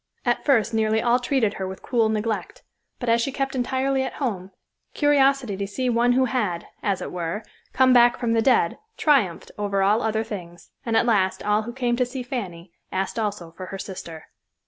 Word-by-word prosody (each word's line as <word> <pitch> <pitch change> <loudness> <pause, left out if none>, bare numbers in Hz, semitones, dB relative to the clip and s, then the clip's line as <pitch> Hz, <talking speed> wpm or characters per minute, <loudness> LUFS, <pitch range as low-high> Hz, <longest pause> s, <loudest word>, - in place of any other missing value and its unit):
At - - +1
first 230 -5 +2
nearly 220 0 +2
all 240 +2 +3
treated 245 -4 +1
her 190 - -1
with 190 0 -8
cool 230 -3 +2
neglect, 220 0 -3 0.4
but 245 - -5
as 230 0 +3
she 275 - -1
kept 270 0 -2
entirely 265 +1 0
at 265 - -3
home, 200 -9 -3 0.5
curiosity 275 -6 +3
to 200 +1 -3
see 250 +5 -1
one 240 +1 +3
who 260 +1 +3
had, 215 -9 -1 0.2
as 200 -3 -1
it - - -6
were, 175 +4 -3 0.3
come 260 0 +4
back 240 -1 +6
from 235 -2 0
the 225 - +3
dead 230 -8 +2 0.2
triumphed 255 - +2
over 200 -1 0
all 210 +4 +3
other 220 -1 0
things; 175 -5 -9
and 230 -3 +1
at - - +3
last 200 -5 +1
all 210 +1 +2
who 230 +2 -6
came 245 -1 0
to 250 - +2
see 255 0 -5
Fanny 190 -9 -6 0.2
asked 190 +4 -2
also 205 -6 -3
for 185 +2 -9
her 195 - -6
sister. 170 -5 -8
225 Hz, 200 wpm, -24 LUFS, 195-250 Hz, 0.5 s, back